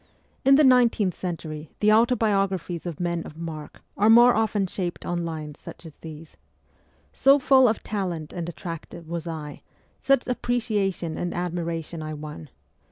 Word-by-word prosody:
In 270 +1 +6
the 300 - +5
nineteenth 240 -7 +4
century 160 -4 -6
the 210 0 +4
autobiographies 195 -7 +1
of 165 -4 -6
men 170 -1 -1
of 155 - -11
mark 160 -3 -8
are 210 +2 +3
more 240 +2 +8
often 215 -2 +1
shaped 180 -1 -4
on 175 0 -2
lines 155 -2 -6
such - - -11
as 160 - -12
these: 160 0 -11 0.4
' - - -37 0.3
So 275 +1 +5
full 265 -1 +5
of 220 - -1
talent 180 -7 -4
and 170 -1 -4
attractive 170 -1 -8
was 170 0 -5
I; 155 -3 -6 0.4
such 275 -2 +2
appreciation 210 -9 -1
and 175 - -3
admiration 170 -2 -3
I 155 0 -5
won 150 0 -9
175 Hz, 160 wpm, -25 LUFS, 160-220 Hz, 0.4 s, more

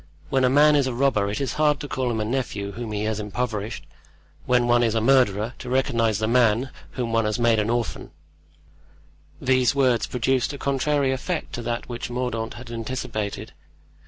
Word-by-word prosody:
When 135 -1 +2
a 125 - +4
man 150 +3 +5
is 140 -2 +3
a 125 - -3
robber 120 -6 +2
it 105 - -3
is 135 - -2
hard 150 -2 +3
to 145 - -5
call 130 -2 -2
him 110 -1 -2
nephew 105 -6 -2
whom 115 +2 -6
he 105 0 -2
has 110 0 -1
impoverished; 105 0 -3 0.6
when 125 -1 +3
one 120 0 +4
is 115 -2 +1
a - - +3
murderer, 115 -3 +3
to 125 - -7
recognize 115 -4 +1
the 110 +1 -1
man 120 +1 +3 0.2
whom 120 -3 -3
one 115 -1 +2
has 105 -1 0
made 115 -2 +3
an 105 +1 0
orphan." 120 -1 -2 1.3
These 130 0 +2
words 125 -5 +2
produced 130 +3 0
a - - -6
contrary 140 0 +1
effect 155 +6 -3
to 120 - -4
that 120 0 -3
which 120 -1 -5
Mordaunt 120 -2 -3
had 120 -1 -10
anticipated. 115 -3 -4
120 Hz, 190 wpm, -24 LUFS, 110-130 Hz, 1.3 s, man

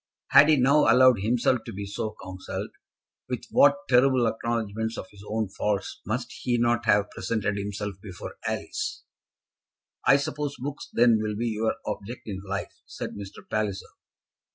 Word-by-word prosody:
Had 145 +2 +8
he 155 - +6
now 140 +4 +5
allowed 130 -3 +6
himself 120 +4 +2
to 115 - -7
be 100 +1 -5
so 105 +2 -4
counselled, 95 0 -6 0.6
with - - -3
what 140 0 +6
terrible 130 0 +4
acknowledgements 110 -1 -2
of - - -5
his 100 -1 -14
own 110 0 0
faults 100 0 -2
must 120 +3 -2
he 120 -1 +1
not 120 0 +1
have 105 -1 +3
presented 105 -3 -2
himself 100 -1 -4
before 95 -4 -8
Alice? - - -3 1.0
"I 140 - +7
suppose 145 0 -3
books, 140 +3 -6
then, 115 -2 +4
will 105 -1 -2
be 115 +2 -1
your 110 0 0
object 105 +3 -5
in 95 -3 -5
life?" 100 0 -4
said - - -6
Mr. 100 -1 -10
Palliser. 105 -3 -2
110 Hz, 155 wpm, -26 LUFS, 100-125 Hz, 1.0 s, Had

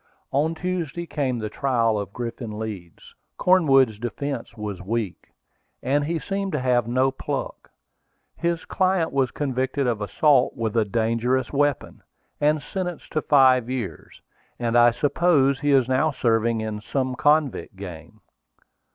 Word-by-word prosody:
On 155 +4 +1
Tuesday 170 -2 -3
came 135 -6 -2
the 110 -2 -3
trial 115 -3 +1
of 100 - -5
Griffin 115 -2 -6
Leeds. 100 -6 -8 0.2
Cornwood's 135 - +4
defence 120 0 -5
was 105 -3 -5
weak, 105 -1 -3 0.6
and 140 +3 +1
he 165 +2 -1
seemed 195 +3 -3
to 150 - 0
have 125 -2 +1
no 130 +2 +2
pluck. 130 - -5 0.7
His 170 -1 -2
client 185 -3 +1
was 135 -2 +2
convicted 135 0 -2
of 115 -4 -1
assault 135 +6 +2
with 115 -2 -2
a 115 -2 +3
dangerous 115 +4 0
weapon, 145 -1 0 0.4
and 150 0 +2
sentenced 180 -3 -5
to 155 - +1
five 130 -5 +4
years; 110 - -5 0.4
and 120 -1 -1
I 120 0 +7
suppose 140 +1 +2
he 145 - -1
is 135 -3 +4
now 130 +4 +2
serving 115 -4 +1
in 110 -1 -4
some 130 +2 -2
convict 145 -5 +1
gang. 95 +2 -10
130 Hz, 145 wpm, -24 LUFS, 115-145 Hz, 0.7 s, I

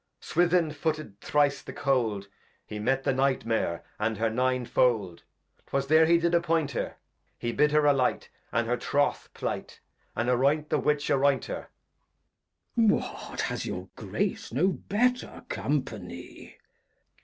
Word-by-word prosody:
Swithin 175 -1 +2
footed 155 -9 -3
Thrice 145 -1 +2
the - - -8
Cold, 120 -8 0 0.4
He 105 - -6
met 135 +5 +1
the - - +2
Night 135 0 +1
Mare 100 -7 -1 0.2
and 110 0 0
her 110 +1 +1
Nine 130 +1 +1
Fold, 110 -9 +1 0.5
'Twas 135 0 0
there 160 +3 +5
he 170 +1 +6
did 170 +1 +1
appoint 165 -3 +2
her; 120 - -3 0.4
He 120 - -2
bid 150 +5 +3
her 150 0 +4
alight, 135 -3 +2 0.2
and 115 +1 +1
her 120 +2 0
Troth 145 +4 0
plight, - - -4 0.4
And 115 +2 -1
arroynt 140 +5 +2
the - - +3
Witch 150 0 +1
arroynt 140 -1 +3
her. - - -5 1.1
Glost. 225 -3 +5 0.4
What, - - -3
has - - -2
your 90 +1 -5
Grace - - -3
no 150 +11 +3
better 245 +6 -1
Company? 105 -11 -4
135 Hz, 145 wpm, -28 LUFS, 115-155 Hz, 1.1 s, he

